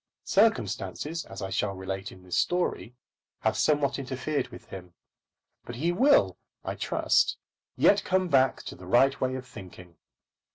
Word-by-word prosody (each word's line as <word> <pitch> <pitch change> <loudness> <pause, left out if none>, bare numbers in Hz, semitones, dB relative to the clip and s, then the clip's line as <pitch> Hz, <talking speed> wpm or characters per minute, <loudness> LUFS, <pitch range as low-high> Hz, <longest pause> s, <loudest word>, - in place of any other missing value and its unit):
Circumstances, 165 - 0
as 95 +1 -8
I 95 - -4
shall 100 0 -1
relate 95 +1 -5
in 95 - -15
this 90 -1 -4
story, 175 -9 0 0.5
have 110 - +1
somewhat 140 +4 +1
interfered 135 +1 -2
with - - -12
him; 90 -2 -10 0.7
but 120 - -8
he 160 +8 0
will, 265 +11 +3 0.3
I - - -2
trust, - - +1 0.4
yet 205 0 +4
come 185 0 +1
back 135 -5 +2
to - - -7
the 90 0 -12
right 135 +6 +3
way 130 0 0
of 130 -1 -6
thinking. 90 -6 -12
125 Hz, 155 wpm, -27 LUFS, 95-155 Hz, 0.7 s, yet